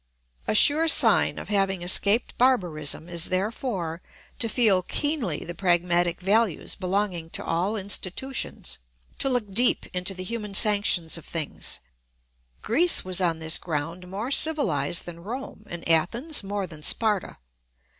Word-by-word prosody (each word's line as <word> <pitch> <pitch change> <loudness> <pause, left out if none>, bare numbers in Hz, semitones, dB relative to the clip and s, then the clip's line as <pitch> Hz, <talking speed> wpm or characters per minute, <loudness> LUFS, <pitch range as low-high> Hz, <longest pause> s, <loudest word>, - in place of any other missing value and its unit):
A - - 0
sure 310 +8 +6
sign 320 - +5
of - - -8
having 195 -3 0
escaped 200 +5 +2
barbarism 175 - 0
is 170 -1 0
therefore 185 -3 -3 0.4
to 230 - +1
feel 215 -6 +3
keenly 250 - -2
the 175 - -6
pragmatic 175 -1 +1
values 200 -1 +1
belonging 185 -3 -2
to - - -5
all 180 +6 -1
institutions, 205 +5 -3 0.4
to 270 - +2
look 245 -6 -1
deep 240 +5 +2
into 180 +2 -1
the 185 - -6
human 210 -1 -5
sanctions 200 -6 +2
of - - -16
things. 160 -3 -3 0.8
Greece 330 - +4
was 185 0 -1
on 170 -3 +1
this 160 0 +2
ground 165 +3 -5
more 210 +7 -5
civilised 175 - +1
than 170 -1 -9
Rome, 225 -1 -8
and 170 -1 -7
Athens 230 - +2
more 200 0 -4
than 155 -4 -11
Sparta. 210 +4 +1
190 Hz, 140 wpm, -25 LUFS, 170-225 Hz, 0.8 s, sure